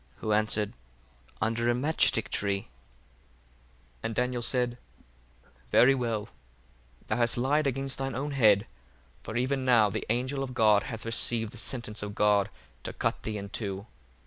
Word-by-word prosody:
Who 110 -1 -1
answered, 105 -1 0 0.7
Under 115 +1 +1
a 120 - +3
mastick 145 +6 +2
tree. 100 -1 0
1:55 - - -20 1.3
And 115 - -3
Daniel 125 0 0
said, 125 0 0 0.9
Very 125 - +6
well; 115 -5 -2 0.8
thou 110 - -1
hast 120 -1 +2
lied 140 +4 +2
against 135 +1 -2
thine 135 -2 -2
own 145 +3 -2
head; 110 -6 +4 0.6
for 110 - -5
even 130 +2 0
now 115 -5 +4
the - - -4
angel 130 +4 0
of 130 -2 -4
God 105 -4 +4
hath 115 -4 -6
received 115 0 +1
the - - -10
sentence 115 -2 -3
of 105 0 -5
God 105 -1 +3 0.3
to - - -6
cut - - -1
thee 110 -1 -4
in 100 0 -6
two. 100 -2 -4
115 Hz, 155 wpm, -29 LUFS, 105-130 Hz, 1.3 s, Very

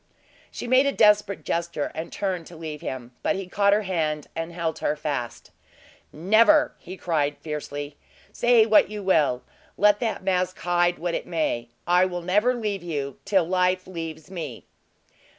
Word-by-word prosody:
She - - -7
made 255 +3 +4
a - - +2
desperate 210 -4 +3
gesture, 170 -3 -2
and 160 +2 -6
turned 185 -4 -3
to 170 - -12
leave 155 -2 -7
him, 125 -2 -6
but 205 - +1
he 195 0 -4
caught 200 +2 +2
her 210 +1 +3
hand 155 -5 -2
and 165 +1 -4
held 165 -2 -3
her 150 - 0
fast. 140 -6 -4 0.6
"Never!" 230 - +4
he 185 +2 -9
cried, 150 -5 0
fiercely. 145 -2 -6 0.3
"Say 235 -2 +4
what 220 -1 +5
you 210 -1 -6
will! 150 -9 +2 0.3
let 205 0 +4
that 225 -5 -2
mask 185 -1 0
hide 175 0 +1
what 175 +1 -3
it - - -3
may! 135 -8 -1 0.2
I 180 +1 +4
will 175 -2 -4
never 210 +8 +2
leave 210 -5 -3
you 145 -6 -4
till 190 -4 +3
life 185 0 +1
leaves 165 -2 -7
me!" 155 -10 -6
175 Hz, 170 wpm, -25 LUFS, 155-200 Hz, 0.6 s, what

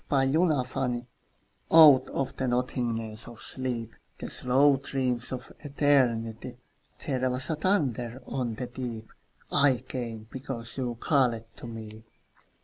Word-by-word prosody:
The 140 +1 +2
Call 125 -2 -2 0.9
Out 130 - -6
of 135 -1 -3
the 130 - -2
nothingness 120 -3 -2
of 120 -1 -11
sleep, 120 -3 -3 0.2
The - - -6
slow 135 +3 +4
dreams 130 -3 -2
of 130 - -6
Eternity, 125 -5 +1 0.5
There 130 -4 0
was 130 +5 0
a - - 0
thunder 130 - 0
on 125 -4 -3
the 125 - -4
deep: 120 -3 -7 0.4
I 140 -2 +5
came, 115 -4 -5
because 130 -2 -5
you 120 -2 -2
called 125 -7 +2
to - - -8
me. 110 -1 -9
125 Hz, 130 wpm, -28 LUFS, 115-135 Hz, 0.9 s, I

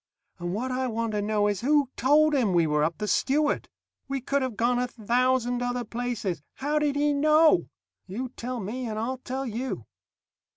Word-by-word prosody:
And 175 0 -3
what 255 +4 -2
I 255 0 -1
want 230 -1 -2
to 210 -1 -1
know 210 0 +1
is 205 -2 0
who 285 +1 +2
told 300 +4 +4
him 240 -9 +2
we 170 -2 +4
were 150 -1 +1
up 160 +2 0
the 210 - -3
Stewart? 290 +7 +1 0.4
We 275 0 -2
could 275 +2 0
have 255 -5 -3
gone 245 +1 +2
a 250 - 0
thousand 245 +2 +1
other 245 0 -1
places. 230 - -3
How 295 +2 0
did 295 -2 0
he 290 0 +2
know? 310 +4 +4 0.4
You 240 +7 -4
tell 250 0 -5
me, 235 +5 -4
and 215 -1 -4
I'll 250 +4 -2
tell 260 +1 -4
you. 245 +2 -4
245 Hz, 195 wpm, -27 LUFS, 215-270 Hz, 0.4 s, told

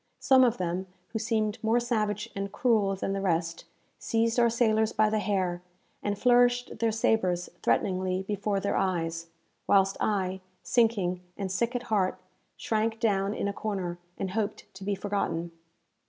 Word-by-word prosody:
Some 260 -1 +5
of 245 -2 +3
them, 180 +1 -2 0.2
who 225 - -3
seemed 220 -1 -1
more 225 +2 +3
savage 215 -2 -1
and 200 0 -3
cruel 215 -6 +2
than 195 +1 -2
the 195 - -2
rest, 170 -2 -1 0.3
seized 230 +1 +1
our 235 -1 +5
sailors 220 -2 +2
by 215 -1 +2
the 215 - +1
hair, 185 -4 -1 0.4
and 205 -1 -2
flourished 245 0 +3
their 230 -1 +2
sabres 185 -5 +1
threateningly 185 -1 +1
before 205 0 -1
their 200 - -1
eyes; 165 -3 -1 0.4
whilst 195 0 +4
I, 190 -3 0 0.2
sinking, 200 -7 +1 0.2
and 195 -2 -3
sick 235 +6 0
at 245 - -1
heart, 205 -5 0 0.4
shrank 225 0 -1
down 205 -2 +1
in - - -1
a 200 - -2
corner, 190 -5 -3 0.2
and 190 -1 -3
hoped 215 0 -3
to 190 - -10
be 200 +1 -1
forgotten. 190 -4 -2
205 Hz, 160 wpm, -28 LUFS, 190-225 Hz, 0.4 s, Some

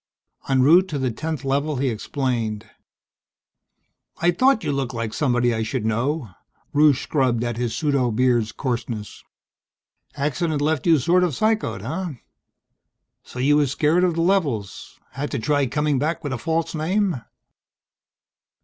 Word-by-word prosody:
En 130 -1 +3
route 175 +7 +6
to 155 - -3
the 130 -2 -1
10th 155 +4 -4
Level 140 +3 0
he 135 0 0
explained. 115 -2 -2 1.5
"I 175 +1 +3
thought 255 +5 +3
you - - -1
looked 135 -3 -2
like 115 -1 -3
somebody 120 -3 +1
I 110 - -2
should 110 +1 -2
know." 120 - -1 0.4
Rusche 145 -2 +4
scrubbed 130 -5 +1
at 120 -1 -3
his 120 -2 -2
pseudo 140 -5 +1
beard's 120 -1 +1
coarseness. 115 -3 -4 0.9
"Accident 150 +2 -1
left 155 +1 0
you 165 -2 +6
sort 175 +7 +3
of 170 -7 0
psychoed, 215 - 0
huh? 165 +6 -4 1.1
So - - -13
you 140 +4 +3
was 145 -3 +2
scared 155 +5 +2
of 175 -3 +2
the 165 - 0
levels? 150 - -1
Had 145 +2 -4
to - - -3
try 145 +3 +1
coming 150 +1 0
back 155 +4 -1
with 145 -3 -3
a 125 - -4
false 165 0 -1
name?" 170 - 0
140 Hz, 150 wpm, -22 LUFS, 120-160 Hz, 1.5 s, route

